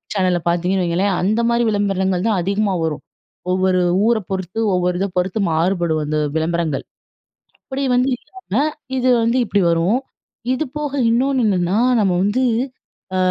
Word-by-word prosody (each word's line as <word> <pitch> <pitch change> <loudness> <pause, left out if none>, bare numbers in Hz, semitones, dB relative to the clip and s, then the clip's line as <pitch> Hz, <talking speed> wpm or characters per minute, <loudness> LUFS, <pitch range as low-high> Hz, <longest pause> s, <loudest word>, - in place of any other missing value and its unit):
சேனல்ல 185 -2 +2
பார்த்தீங்கன்னு 180 +2 +1
வைங்களேன். 180 +4 +1
அந்த 210 +5 +1
மாரி 235 0 +2
விளம்பரங்கள் 195 -2 0
தான் 210 -4 +1
அதிகமா 200 +2 0
வரும். 160 -2 -3 0.5
ஒவ்வொரு 185 0 +2 0.3
ஊர 235 -1 +3
பொறுத்து, 190 +2 -3 0.2
ஒவ்வொரு 180 0 0
இதை 195 - 0
பொறுத்து 185 +4 0
மாறுபடும், 165 -1 +1
அந்த 155 +1 -1 0.2
விளம்பரங்கள். 160 -3 -1 0.8
அப்டி 270 +1 -3
வந்து 250 +2 +2
இல்லாம, 280 - -4 0.4
இது 255 0 +1 0.2
வந்து 235 +2 +1
இப்டி 205 -2 +1
வரும். 170 +8 +2 0.5
இது 260 - -1
போக 295 -1 -3 0.2
இன்னொன்னு 260 +3 +2
என்னன்னா 185 -1 +1 0.2
நம்ம 190 -3 +2
வந்து, 205 +6 +1 0.7
அ - - +1
190 Hz, 145 wpm, -19 LUFS, 175-225 Hz, 0.8 s, ஊர